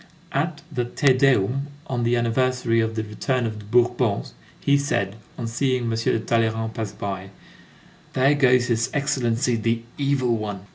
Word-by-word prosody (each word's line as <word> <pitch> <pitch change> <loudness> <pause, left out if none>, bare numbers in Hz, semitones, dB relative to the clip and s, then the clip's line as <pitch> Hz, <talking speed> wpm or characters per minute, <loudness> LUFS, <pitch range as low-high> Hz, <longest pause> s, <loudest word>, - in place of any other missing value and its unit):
At 150 +2 -2
the 125 -4 -1
Te 130 +3 +3
Deum 135 0 +2 0.2
on 125 -5 -2
the 120 +1 +2
anniversary 120 0 +1
of 110 0 0
the 110 - -1
return 120 +4 -1
of 110 -1 -4
the 105 - -11
Bourbons, 120 - +1 0.3
he 140 - +3
said, 105 -9 0 0.2
on 120 - -4
seeing 125 +2 0
M. 115 - -1
de 115 0 +1
Talleyrand 110 0 0
pass 110 -3 -4
by: 95 -2 -5 0.8
"There 135 +2 +4
goes 125 -3 +4
his 115 0 0
Excellency 125 -4 +1
the 115 +1 0 0.2
Evil 135 -4 +1
One." 105 -3 -4
120 Hz, 160 wpm, -23 LUFS, 110-130 Hz, 0.8 s, There